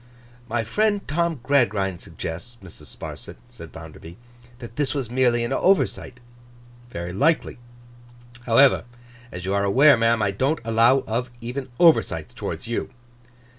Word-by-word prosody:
'My 115 0 -1
friend 205 - 0
Tom 165 -2 -1
Gradgrind 100 -10 +1
suggests, 90 +9 -7
Mrs. 95 - -13
Sparsit,' - - -8
said - - -12
Bounderby, 80 +1 -11 0.4
'that 120 -2 -11
this 145 -1 -1
was 130 -5 -3
merely 120 -2 +2
an 120 +3 -2
oversight. 175 -7 +1 0.7
Very 85 -5 -6
likely. 145 - +1 0.9
However, 125 +2 +4 0.5
as 90 +1 -7
you 95 - -1
are 100 0 +1
aware, 135 +9 +6
ma'am, 115 0 +2
I 100 - +1
don't 135 +10 0
allow 115 +4 +3
of 120 +3 -2
even 125 +3 -6
oversights 155 - +3
towards - - -6
you. 115 - -3
120 Hz, 135 wpm, -23 LUFS, 100-140 Hz, 0.9 s, aware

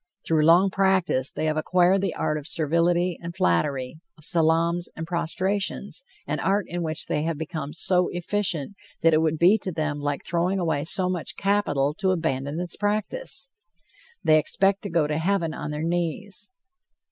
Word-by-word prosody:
Through 155 -2 +2
long 180 +4 +5
practice, 190 -9 +2
they - - -3
have 155 0 0
acquired 180 +4 +3
the 195 -3 -2
art 155 0 -1
of 150 - -10
servility 170 +2 +1
and 170 0 -7
flattery, 130 - 0 0.2
of 155 - -13
salaams 170 +1 +2
and 160 - -5
prostrations 190 - -2 0.2
an - - -2
art 200 0 +1
in 175 +1 -4
which 160 -1 -2
they 150 - -1
have 160 0 -2
become 155 -2 -5
so 180 +1 +2
efficient 180 -1 -2 0.3
that 165 0 +4
it 155 - +4
would 160 0 +1
be 185 +7 +5
to 190 - -4
them 155 -2 -2
like 145 -1 -3
throwing 175 +3 0
away 160 -5 -1
so 185 +2 +2
much 180 -3 -3
capital 170 -9 +1
to 190 - +1
abandon 155 -4 -1
its 175 -1 -2
practice. 270 - -2 0.7
They 155 0 +5
expect 195 +6 +2
to 200 - -5
go 165 -3 +2
to 150 +1 -1
Heaven 170 -2 0
on 150 - -5
their 150 +1 -4
knees. 175 +4 -2
170 Hz, 175 wpm, -25 LUFS, 155-190 Hz, 0.7 s, long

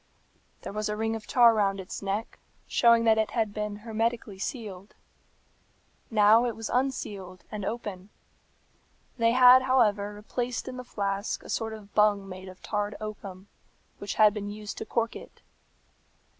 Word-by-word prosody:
There - - -6
was 215 0 -2
a 210 - -2
ring 225 +1 -1
of 220 - -8
tar 240 -2 +6
round 200 -2 +1
its 190 - -7
neck, 200 +3 -3 0.3
showing 235 -1 +4
that 220 -1 +4
it 215 -1 +1
had 220 -3 0
been 210 -1 -3
hermetically 225 -2 -2
sealed. 205 -6 -6 1.1
Now 215 +1 +5
it 235 - -3
was 225 -1 -5
unsealed 205 -8 -2
and 210 -2 -5
open. 205 -3 -5 1.1
They 230 0 +4
had, 255 0 +8
however, 210 -6 +2
replaced 240 +3 -4
in 255 0 -6
the 250 - -6
flask 200 -3 -3
a - - -12
sort 225 -1 -2
of 210 -2 -12
bung 210 -2 +3
made 185 0 -9
of 185 - -14
tarred 205 -1 -2
oakum, 200 -3 -8 0.5
which 200 - -4
had 215 -2 +6
been 205 -1 -5
used 210 0 -7
to - - -5
cork 230 +1 -1
it. - - -12
215 Hz, 160 wpm, -28 LUFS, 200-230 Hz, 1.1 s, had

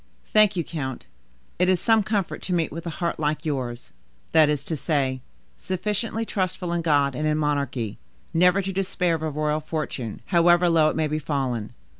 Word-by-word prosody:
"Thank 215 -1 +4
you, 170 - 0
count: 135 -6 -5 0.5
it 180 +1 +3
is 185 -2 +3
some 225 -1 +4
comfort 200 -2 -2
to 180 - -1
meet 165 -3 0
with 165 +2 -6
a 165 - -5
heart 170 -1 -2
like 150 +1 -1
yours; 125 -5 -3 0.4
that 155 -2 +6
is 145 -2 0
to 160 - -2
say, 135 -3 0 0.4
sufficiently 210 +4 -2
trustful 185 -3 -2
in 170 - 0
God 145 -4 +2
and 150 +4 -1
in 155 0 +1
monarchy, 140 -7 -1 0.3
never 180 +3 +4
to 195 +1 -3
despair 185 -2 0
of 160 - -2
a 160 - -1
royal 150 +1 0
fortune, 150 -7 -4
however 175 0 +4
low 160 -2 +5
it - - -3
may 160 -1 +1
be 155 +1 -1
fallen. 130 -7 -2
160 Hz, 190 wpm, -24 LUFS, 145-180 Hz, 0.5 s, that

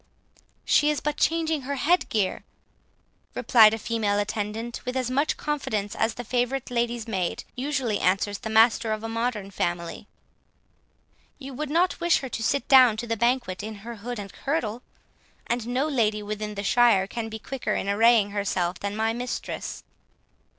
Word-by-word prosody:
"She 295 - +4
is 300 - 0
but 300 0 -2
changing 320 -2 +1
her 280 +2 -3
head 340 +7 +2
gear," 205 -4 -1 0.9
replied 225 -3 +6
a 225 - -2
female 220 -2 -1
attendant, 210 +3 -3
with 250 +1 -3
as 255 -1 -1
much 285 +4 +1
confidence 220 -9 -2
as 225 0 0
the 245 - -6
favourite 250 +2 -1
lady's 235 -1 -1
maid 190 -5 -2
usually 260 -5 -1
answers 195 +2 +1
the 220 - -5
master 225 0 +4
of 215 0 -5
a - - -3
modern 225 -3 -2
family; 175 +1 -3 1.3
"you 275 -1 -9
would 300 +3 -4
not 345 +4 +1
wish 345 0 +3
her 265 - -5
to 225 - -4
sit 275 +5 0
down 255 -5 +7
to 230 - -4
the 230 -1 -1
banquet 235 -4 0
in 215 +1 -6
her 235 -1 -7
hood 240 +4 -6
and 200 -1 -7
kirtle? 245 -6 -2 0.6
and 235 -1 -2
no 255 +5 0
lady 215 -7 +1
within 210 0 -4
the 200 - -4
shire 230 -3 +4
can 225 +2 -5
be 220 - -6
quicker 260 +4 -3
in - - -2
arraying 215 0 +4
herself 185 -3 -1
than 200 0 -3
my 220 +1 0
mistress." 245 +1 -5
230 Hz, 170 wpm, -25 LUFS, 210-255 Hz, 1.3 s, down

